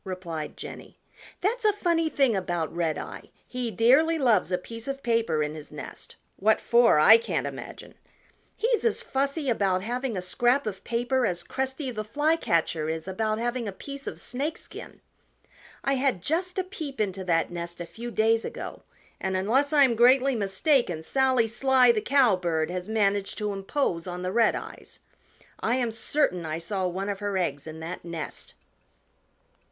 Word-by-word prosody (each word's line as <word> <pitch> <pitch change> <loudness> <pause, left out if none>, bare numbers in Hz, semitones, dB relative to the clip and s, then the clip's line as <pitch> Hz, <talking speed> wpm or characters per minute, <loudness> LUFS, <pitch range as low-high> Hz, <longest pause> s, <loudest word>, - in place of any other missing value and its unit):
replied 175 -5 -5
Jenny. - - -9 0.4
"That's 460 +6 0
a 425 - +5
funny 340 -5 +1
thing 270 -7 +2
about 175 -4 -2
Redeye; 165 -3 -3 0.2
he 250 -2 -3
dearly 265 - +4
loves 230 - +2
a 180 - +2
piece 230 +6 -9
of 275 0 -4
paper 230 - +1
in 150 0 -3
his 155 -1 -10
nest. - - -9 0.2
What 215 +3 +3
for, 235 -6 +4
I 220 +9 +8
can't 230 - -2
imagine. - - -8 0.6
He's 465 +1 +1
as 460 - +2
fussy 280 +2 -1
about 195 -6 +1
having 245 0 -2
a - - -2
scrap 240 +9 +2
of 200 -3 -5
paper 245 +2 0
as 175 -1 -2
Cresty 265 +1 -3
the 215 -1 -3
Flycatcher 215 - +1
is 160 +2 -4
about 215 +3 -1
having 240 0 -2
a - - -2
piece 275 +7 -8
of - - -5
Snakeskin. 290 +6 -5 0.8
I 275 - +1
had 260 -9 0
just 360 +4 -1
a 375 - +1
peep 315 -7 -7
into 195 -3 -1
that 165 -2 +1
nest 170 0 -5
a 175 - -4
few 235 +7 -8
days 225 0 +2
ago - - -6 0.4
and 190 0 -1
unless 255 +10 +2
I 295 -2 +6
am 255 -3 +4
greatly 255 +3 +5
mistaken 200 - +1
Sally 260 +3 +2
Sly 250 +2 +4
the 220 -2 0
Cowbird 185 - +2
has 180 +2 -4
managed 200 -2 +1
to 210 -2 -2
impose 195 - -2
on 180 0 -5
the 185 - -2
Redeyes. 230 +1 -1 0.6
I 230 - +1
am 245 -3 0
certain 225 - 0
I 155 0 -3
saw 190 +2 -2
one 190 +3 -3
of 200 -1 -3
her 205 -2 -2
eggs 145 -5 -2
in 160 0 -8
that 170 +3 -6
nest." 170 -3 -6
225 Hz, 170 wpm, -27 LUFS, 180-265 Hz, 0.8 s, I